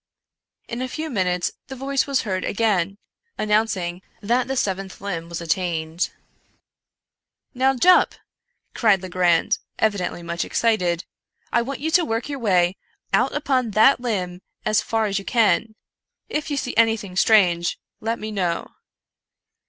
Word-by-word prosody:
In 235 Hz, +1 st, -4 dB
a 255 Hz, -, -1 dB
few 315 Hz, +3 st, -5 dB
minutes 180 Hz, -5 st, 0 dB, 0.2 s
the 265 Hz, -, -7 dB
voice 270 Hz, +2 st, -1 dB
was 275 Hz, -2 st, +1 dB
heard 190 Hz, -3 st, -2 dB
again, 200 Hz, -3 st, 0 dB, 0.4 s
announcing 210 Hz, -5 st, 0 dB, 0.2 s
that 240 Hz, +4 st, +1 dB
the 270 Hz, -, -2 dB
seventh 195 Hz, -3 st, -2 dB
limb 170 Hz, -4 st, -4 dB
was 170 Hz, 0 st, -5 dB
attained. 165 Hz, 0 st, -1 dB, 0.7 s
'' -, -, -62 dB
Now, 265 Hz, 0 st, +4 dB
Jup," 360 Hz, +9 st, +5 dB, 0.6 s
cried 205 Hz, -5 st, +3 dB
Legrand, 180 Hz, -2 st, +2 dB, 0.2 s
evidently 195 Hz, -5 st, -1 dB
much 170 Hz, 0 st, -2 dB
excited, 180 Hz, -7 st, +1 dB, 0.2 s
" -, -, -39 dB
I 235 Hz, -, +4 dB
want 270 Hz, +3 st, -5 dB
you 320 Hz, +2 st, -1 dB
to 345 Hz, +1 st, +5 dB
work 230 Hz, -2 st, -2 dB
your 280 Hz, -1 st, -4 dB
way 185 Hz, -5 st, +2 dB, 0.4 s
out 250 Hz, +7 st, +3 dB
upon 265 Hz, -5 st, +1 dB
that 260 Hz, +5 st, +6 dB
limb 185 Hz, -7 st, -3 dB, 0.2 s
as 215 Hz, -, +3 dB
far 225 Hz, -1 st, 0 dB
as 200 Hz, -1 st, 0 dB
you -, -, -9 dB
can. 225 Hz, -1 st, +2 dB, 0.5 s
If 300 Hz, +1 st, -2 dB
you 290 Hz, -, -1 dB
see 250 Hz, -, -3 dB
anything 225 Hz, -4 st, +2 dB
strange 180 Hz, -5 st, +3 dB, 0.2 s
let 225 Hz, +1 st, -2 dB
me 215 Hz, 0 st, -6 dB
know." 180 Hz, -5 st, -2 dB
210 Hz, 150 wpm, -23 LUFS, 180-245 Hz, 0.7 s, that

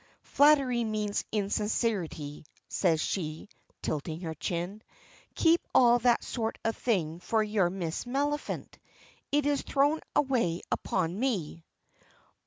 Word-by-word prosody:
"Flattery 275 Hz, -5 st, +4 dB
means 215 Hz, -2 st, -1 dB
insincerity," 200 Hz, -8 st, -1 dB, 0.2 s
says 165 Hz, -4 st, +1 dB
she, 155 Hz, +1 st, -3 dB, 0.3 s
tilting 155 Hz, +2 st, -3 dB
her 165 Hz, -3 st, -4 dB
chin, 175 Hz, +6 st, -4 dB, 0.5 s
"keep 330 Hz, +1 st, +4 dB
all 240 Hz, -1 st, +6 dB
that 240 Hz, 0 st, +3 dB
sort 225 Hz, -2 st, -3 dB
of 225 Hz, -, +1 dB
thing 170 Hz, -9 st, -1 dB
for 220 Hz, +4 st, +1 dB
your 210 Hz, -4 st, +1 dB
Miss 175 Hz, -1 st, -4 dB
Maliphant; 290 Hz, +4 st, -2 dB, 0.5 s
it 290 Hz, 0 st, +2 dB
is 290 Hz, -1 st, +1 dB
thrown 290 Hz, +3 st, +2 dB, 0.2 s
away 235 Hz, -12 st, +1 dB
upon 180 Hz, +1 st, -1 dB
me." 185 Hz, -, -2 dB
215 Hz, 115 wpm, -29 LUFS, 170-250 Hz, 0.5 s, all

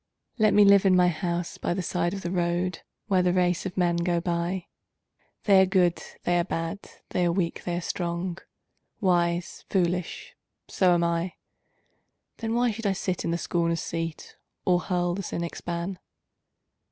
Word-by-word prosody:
Let 215 Hz, -1 st, +4 dB
me 205 Hz, 0 st, +7 dB
live 200 Hz, -1 st, +7 dB
in 185 Hz, -, +5 dB
my 180 Hz, -1 st, +5 dB
house 170 Hz, +1 st, -3 dB
by 175 Hz, -, -1 dB
the 185 Hz, -, -2 dB
side 175 Hz, +2 st, -1 dB
of 195 Hz, -, -7 dB
the 175 Hz, -, -3 dB
road, 175 Hz, 0 st, 0 dB, 0.3 s
Where 190 Hz, -3 st, +3 dB
the 180 Hz, -1 st, +2 dB
race 180 Hz, 0 st, +1 dB
of 185 Hz, -, -9 dB
men 175 Hz, -2 st, +2 dB
go 170 Hz, 0 st, +1 dB
by 170 Hz, +1 st, -2 dB, 0.8 s
They 195 Hz, -3 st, +6 dB
are 190 Hz, -, +4 dB
good, 180 Hz, -2 st, +2 dB, 0.2 s
they 175 Hz, 0 st, +2 dB
are -, -, +2 dB
bad, 165 Hz, +1 st, -3 dB, 0.3 s
they 180 Hz, -, 0 dB
are 175 Hz, -, +3 dB
weak, 170 Hz, -1 st, -2 dB
they 175 Hz, -, -1 dB
are -, -, -2 dB
strong, 170 Hz, +1 st, -3 dB, 0.6 s
Wise, 175 Hz, -3 st, 0 dB
foolish 180 Hz, -2 st, -1 dB, 0.3 s
so 180 Hz, -2 st, +3 dB
am 170 Hz, -, +1 dB
I. 170 Hz, +1 st, 0 dB, 1.0 s
Then 225 Hz, 0 st, -2 dB
why 240 Hz, 0 st, +2 dB
should 220 Hz, 0 st, -3 dB
I 195 Hz, -, +2 dB
sit 185 Hz, -1 st, -2 dB
in -, -, -1 dB
the 170 Hz, -, 0 dB
scorner's 170 Hz, -1 st, 0 dB
seat, 165 Hz, -1 st, -5 dB, 0.3 s
Or 180 Hz, -1 st, +4 dB
hurl 175 Hz, -1 st, 0 dB
the 195 Hz, -, -3 dB
cynic's 170 Hz, -2 st, -4 dB
ban? 175 Hz, +2 st, -4 dB
175 Hz, 175 wpm, -26 LUFS, 170-185 Hz, 1.0 s, me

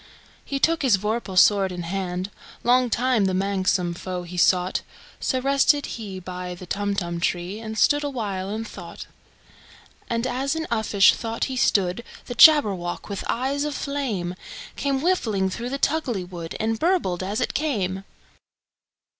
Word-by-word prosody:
He 275 Hz, -, -3 dB
took 330 Hz, +4 st, +2 dB
his 250 Hz, -8 st, +4 dB
vorpal 210 Hz, -1 st, -3 dB
sword 195 Hz, 0 st, +5 dB
in 180 Hz, -1 st, -5 dB
hand:Long 195 Hz, +7 st, -1 dB
time 245 Hz, -2 st, +2 dB
the 190 Hz, -1 st, 0 dB
manxome 190 Hz, -2 st, 0 dB
foe 180 Hz, +1 st, -5 dB
he 175 Hz, +1 st, -9 dB
sought—So 180 Hz, +8 st, 0 dB
rested 275 Hz, +2 st, +3 dB
he 200 Hz, -5 st, -6 dB
by 180 Hz, 0 st, -6 dB
the 180 Hz, -, -10 dB
Tumtum 195 Hz, -3 st, -2 dB
tree, 175 Hz, +4 st, -2 dB
And 220 Hz, -1 st, -6 dB
stood 290 Hz, +6 st, +3 dB
awhile 205 Hz, -9 st, -3 dB
in 220 Hz, +2 st, -3 dB
thought. 175 Hz, -5 st, -9 dB, 1.0 s
And 230 Hz, +1 st, -1 dB
as 265 Hz, +4 st, -1 dB
in 320 Hz, 0 st, -2 dB
uffish 215 Hz, -3 st, +4 dB
thought 225 Hz, 0 st, -4 dB
he 265 Hz, -, -2 dB
stood, 195 Hz, -3 st, +1 dB, 0.2 s
The 245 Hz, -, -5 dB
Jabberwock, 210 Hz, -, +5 dB
with 200 Hz, -2 st, -4 dB
eyes 270 Hz, +4 st, 0 dB
of 295 Hz, -1 st, -3 dB
flame, 240 Hz, -12 st, -2 dB, 0.4 s
Came 275 Hz, -1 st, -1 dB
whiffling 220 Hz, -, +1 dB
through 235 Hz, +5 st, -4 dB
the 275 Hz, -, -2 dB
tulgey 275 Hz, -, 0 dB
wood, 170 Hz, -2 st, -7 dB
And 220 Hz, 0 st, -1 dB
burbled 320 Hz, -, +1 dB
as 200 Hz, +3 st, -2 dB
it -, -, -1 dB
came! 195 Hz, -11 st, -1 dB
210 Hz, 150 wpm, -24 LUFS, 185-260 Hz, 1.0 s, sword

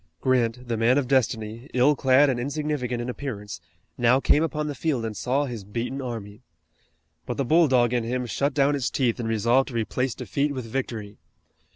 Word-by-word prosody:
Grant, 125 Hz, 0 st, 0 dB
the 115 Hz, -1 st, -1 dB
man 120 Hz, +4 st, +3 dB
of 140 Hz, -3 st, 0 dB
destiny, 115 Hz, -1 st, 0 dB
ill 130 Hz, +4 st, +4 dB
clad 135 Hz, +2 st, +4 dB
and 130 Hz, -3 st, 0 dB
insignificant 135 Hz, -3 st, -2 dB
in -, -, -6 dB
appearance, 110 Hz, -8 st, -6 dB, 0.4 s
now 120 Hz, +2 st, +4 dB
came 145 Hz, -, +3 dB
upon 150 Hz, -2 st, -1 dB
the 150 Hz, -, -3 dB
field 140 Hz, -6 st, -1 dB
and 110 Hz, -1 st, -4 dB
saw 135 Hz, +7 st, 0 dB
his 120 Hz, -6 st, -6 dB
beaten 115 Hz, +7 st, -4 dB
army. 115 Hz, -4 st, -6 dB, 0.9 s
But -, -, -3 dB
the 140 Hz, -, 0 dB
bulldog 130 Hz, -6 st, +4 dB
in 120 Hz, -2 st, +1 dB
him 125 Hz, +2 st, -2 dB
shut 140 Hz, +4 st, -1 dB
down 140 Hz, 0 st, +3 dB
its 135 Hz, -4 st, -1 dB
teeth 125 Hz, -3 st, 0 dB
and 115 Hz, -2 st, -2 dB
resolved 115 Hz, +4 st, +2 dB
to 125 Hz, -, -8 dB
replace 120 Hz, +2 st, -1 dB
defeat 140 Hz, 0 st, -2 dB
with 130 Hz, -3 st, -4 dB
victory. 110 Hz, -4 st, -5 dB
125 Hz, 190 wpm, -25 LUFS, 115-140 Hz, 0.9 s, ill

